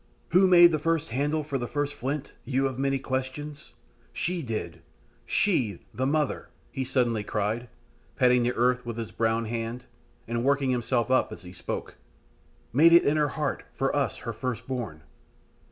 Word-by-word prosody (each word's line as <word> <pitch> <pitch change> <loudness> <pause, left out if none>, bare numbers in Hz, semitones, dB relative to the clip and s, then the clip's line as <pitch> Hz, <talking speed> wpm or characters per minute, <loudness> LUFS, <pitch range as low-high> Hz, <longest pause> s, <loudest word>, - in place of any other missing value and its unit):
"Who 185 +3 +5
made 175 -1 +8
the 155 - 0
first 165 0 0
handle 145 +4 0
for 140 -2 -3
the 120 - -3
first 145 +3 -2
flint, 140 +3 -4
you 135 0 0
of 130 -2 -2
the - - -2
many 135 0 +1
questions? 135 +3 -5 0.4
She 175 0 -2
did 105 - -4 0.5
she, 125 - +1
the 130 +1 -1
Mother," 150 0 0 0.2
he 135 - -2
suddenly 120 -4 +1
cried, 105 +4 -2 0.5
patting 125 -1 +4
the 120 +1 +1
earth 125 +1 +2
with 120 -1 -5
his 115 -2 -5
brown 115 0 0
hand, 115 +2 -4 0.4
and 115 +1 -1
working 140 -1 +2
himself 120 0 0
up 130 - +3
as 110 - -9
he 90 0 -10
spoke, - - -5 0.8
"made 165 +6 +6
it 170 - +7
in 145 - +3
her 150 -1 +2
heart 150 -3 -1
for 135 +1 0
us 145 -2 0
her 115 - -3
first 125 0 -4
born. 110 -13 -4
130 Hz, 175 wpm, -27 LUFS, 115-145 Hz, 0.8 s, made